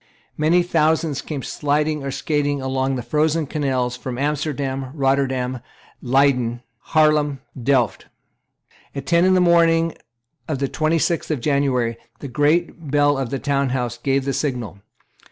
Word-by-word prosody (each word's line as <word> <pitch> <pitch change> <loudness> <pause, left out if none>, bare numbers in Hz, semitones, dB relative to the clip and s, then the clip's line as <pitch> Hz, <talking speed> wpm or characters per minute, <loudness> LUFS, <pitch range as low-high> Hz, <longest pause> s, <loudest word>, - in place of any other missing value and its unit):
Many 165 +4 +3
thousands 160 -3 +1
came 145 -4 -5
sliding 150 0 -1
or 135 - -3
skating 145 0 -1
along 130 0 -1
the 125 - -4
frozen 155 +5 +1
canals 130 -4 -1
from 125 0 -6
Amsterdam, 140 -2 -2
Rotterdam, 135 -2 0 0.4
Leyden, 125 -2 +2 0.3
Haarlem, 150 -2 +3 0.2
Delft. 125 -3 +1 0.9
At 140 -1 -5
ten 170 +2 +3
in 185 0 +4
the - - +4
morning 165 -2 +4 0.5
of 155 -4 -2
the 140 +1 -1
twenty 155 +4 0
sixth 170 +1 0
of 155 -4 -1
January, 125 -4 0 0.2
the 140 - -7
great 150 +3 0
bell 145 0 +3
of 135 -3 -2
the 135 - -2
Town 140 -1 0
House 125 -2 -2
gave 135 -1 0
the 140 - -1
signal. 125 -8 -3
140 Hz, 145 wpm, -21 LUFS, 130-155 Hz, 0.9 s, in